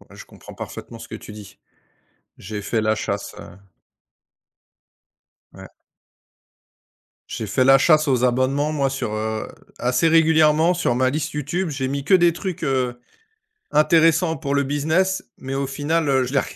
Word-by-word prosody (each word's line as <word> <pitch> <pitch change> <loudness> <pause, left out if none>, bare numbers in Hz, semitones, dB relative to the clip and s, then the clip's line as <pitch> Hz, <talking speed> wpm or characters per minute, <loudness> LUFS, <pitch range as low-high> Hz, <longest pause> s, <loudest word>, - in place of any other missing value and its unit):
Ouais, - - -18
je - - -11
comprends - - -14
parfaitement - - -9
ce - - -10
que - - -8
tu - - -12
dis. 105 -2 -12 0.8
J'ai 105 +1 -6
fait 110 +2 -1
la 110 0 +2
chasse, - - -4
heu 90 - -12 2.0
Ouais. - - -12 1.6
J'ai - - -5
fait 130 - +1
la 135 +1 +7
chasse 155 +2 +3
aux 130 -3 +1
abonnements, 130 +4 +1
moi, 140 -3 0
sur, 135 -5 -4
heu, 110 0 -3 0.3
assez 125 +6 +1
régulièrement 160 0 +4
sur 170 -9 0
ma 130 +1 +2
liste 150 +2 -3
YouTube, 150 +5 -2
j'ai 135 -3 -3
mis 140 0 -4
que 190 - +2
des 175 -2 +5
trucs, 180 0 -6
heu, 130 -4 -1 0.7
intéressants 160 +2 +3
pour 140 +1 -3
le 140 - +2
business 160 +7 0
mais 135 0 -6
au 140 0 -1
final, 150 +3 -1
heu, 135 -2 +2
je 125 - -6
les 140 - +3
140 Hz, 165 wpm, -21 LUFS, 130-160 Hz, 2.0 s, la